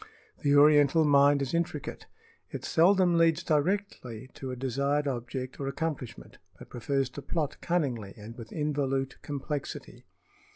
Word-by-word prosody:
The 145 -1 +3
oriental 145 +1 +6
mind 140 -1 +5
is 135 - -4
intricate. 165 -4 -3 0.4
It - - -6
seldom 175 0 +4
leads 165 -1 +3
directly 150 - -1
to 135 - -7
a 125 - -4
desired 140 +3 0
object 130 0 -4
or 135 - -3
accomplishment, 140 -4 -5 0.2
but - - -13
prefers 135 +2 -1
to 145 - -8
plot 150 -1 -3
cunningly 130 - -1
and 110 +2 -10
with 115 -2 -10
involute 140 -3 -2
complexity. 145 0 -6
140 Hz, 135 wpm, -29 LUFS, 130-155 Hz, 0.4 s, oriental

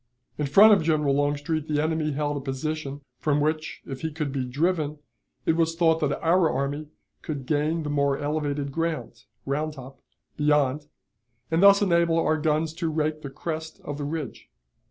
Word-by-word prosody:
In 150 - 0
front 205 +10 +8
of 195 - +4
General 155 -3 +2
Longstreet 145 +2 0
the 150 -1 0
enemy 155 -1 0
held 145 +1 -1
a - - -2
position, 140 +1 -4 0.2
from 150 -1 +1
which, 155 +1 -2
if 135 -2 -7
he 160 - -2
could 150 -2 -3
be 135 -1 -2
driven, 150 +3 0 0.5
it 160 - +3
was 165 0 +1
thought 165 -1 +3
that 150 -2 0
our 170 0 +4
army 145 +2 -2 0.3
could 140 -4 -5
gain 155 +3 0
the 150 - -4
more 140 -1 +1
elevated 145 -1 -2
ground 155 -6 -3 0.2
(Round 150 +3 -1
Top) 135 -1 -12 0.4
beyond, 150 -1 +2 0.6
and 165 +2 +2
thus 200 +1 +7
enable 170 -3 +3
our 155 -1 +2
guns 155 +1 0
to 170 -2 -1
rake 155 0 -1
the 140 - -6
crest 160 +3 -5
of 145 0 -5
the - - -3
ridge. 150 -4 -5
150 Hz, 175 wpm, -26 LUFS, 145-160 Hz, 0.6 s, front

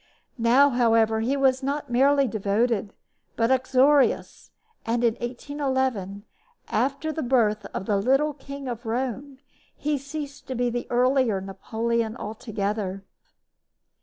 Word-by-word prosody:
Now, 255 +5 +5
however, 225 -2 +3
he 255 +5 0
was 265 -1 +2
not 280 0 -3
merely 275 +2 +4
devoted, 210 0 0 0.4
but 230 +2 +1
uxorious; 260 +2 +2 0.3
and 235 +1 -1
in 230 -2 +3
1811, 255 -6 -2 0.4
after 280 +4 0
the 315 - -4
birth 220 -5 +1
of 190 - -6
the 205 -1 +1
little 270 +8 +2
King 280 0 -8
of 240 -1 -5
Rome, 260 +3 -3 0.4
he 295 -1 -1
ceased 285 +1 -7
to 260 - -4
be 245 0 0
the 240 0 -3
earlier 250 -4 +2
Napoleon 225 +4 -2
altogether. 205 -3 -4
245 Hz, 125 wpm, -25 LUFS, 220-275 Hz, 0.4 s, Now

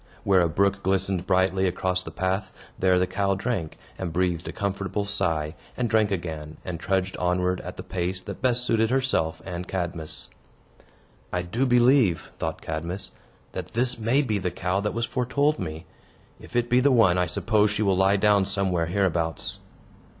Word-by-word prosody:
Where 95 -2 +4
a 85 - +2
brook 100 +4 +1
glistened 95 -1 0
brightly 95 0 +2
across 90 0 0
the 90 - -8
path, 95 +4 -2 0.3
there 95 -1 +4
the 90 - +3
cow 100 +1 0
drank, 95 -6 -3 0.2
and 95 -3 -3
breathed 90 -1 0
a - - -3
comfortable 100 0 -2
sigh, 80 -6 -1 0.2
and 125 - +1
drank 110 -2 +3
again, 80 -5 -4
and 90 -3 -4
trudged 95 +1 0
onward 90 +1 0
at - - -8
the - - -6
pace 90 +1 -2
that - - -8
best 125 -1 +2
suited 115 -2 +2
herself 130 -11 0
and 90 -1 -5
Cadmus. 85 -4 -4 1.0
"I 90 -1 -1
do 115 +10 0
believe," 120 - +4
thought - - -3
Cadmus, 85 +5 -3 0.4
"that - - -6
this 120 +1 +1
may 120 +6 +2
be 110 -6 0
the 90 -1 -1
cow 90 +2 -1
that 105 +2 -2
was 115 0 0
foretold 140 +5 +1
me. 80 +2 -5 0.5
If - - -13
it 120 -1 +2
be 125 +1 +4
the 140 +2 +4
one, 100 -8 +5
I 90 - +2
suppose 105 +5 +2
she 105 +1 0
will 100 -2 +3
lie 95 +2 +4
down 100 -1 +4
somewhere 95 -4 0
hereabouts." 85 -3 -1
95 Hz, 180 wpm, -25 LUFS, 90-110 Hz, 1.0 s, one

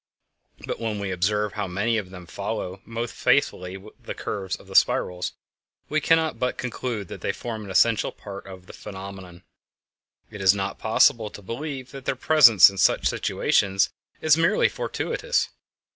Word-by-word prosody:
But - - -4
when 110 -2 -2
we 100 -1 -3
observe 105 +3 0
how 105 -1 -3
many 110 +5 0
of 95 -3 -8
them 90 -1 -10
follow 100 0 -5
most 115 0 -4
faithfully 90 +1 +1 0.2
the - - -6
curves 95 -3 -4
of - - -15
the - - -12
spirals 90 0 +2 0.6
we 155 +1 +1
cannot 160 -7 +2
but 125 0 -1
conclude 120 -4 -4
that - - -8
they - - 0
form 110 -3 -6
an 100 - -9
essential 110 +4 +3
part 100 -1 -10
of 95 -1 -11
the - - -12
phenomenon; 95 -3 -9 0.9
it 105 - -8
is 95 +1 +5
not 100 0 -3
possible 110 0 +3
to 105 - -12
believe 130 +4 -6
that 135 -2 -10
their - - 0
presence 125 - +7
in 100 -1 -3
such - - +3
situations 95 0 +1 0.3
is 155 -1 +5
merely 170 +5 +3
fortuitous. - - -2
105 Hz, 165 wpm, -24 LUFS, 95-120 Hz, 0.9 s, presence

